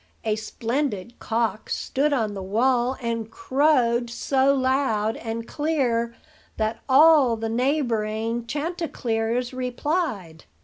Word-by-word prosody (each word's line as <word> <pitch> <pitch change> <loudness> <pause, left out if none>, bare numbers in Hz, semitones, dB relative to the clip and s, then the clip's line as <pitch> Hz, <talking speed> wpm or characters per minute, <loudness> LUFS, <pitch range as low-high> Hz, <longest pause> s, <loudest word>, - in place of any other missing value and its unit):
A 215 -1 +1
splendid 230 0 -3
cock 225 -1 -1
stood 290 +3 0
on 225 -7 0
the 195 - -5
wall, 240 +6 +1
and 230 -1 -2
crowed 260 -8 +2
so 265 +3 +2
loud 260 -5 +1
and 230 0 -5
clear 250 -7 0 0.4
that 220 +1 -1
all 280 -4 +6
the 225 0 -3
neighboring 230 -3 -1
chanticleers 250 -7 -2
replied. 250 - -3
240 Hz, 105 wpm, -24 LUFS, 225-275 Hz, 0.4 s, all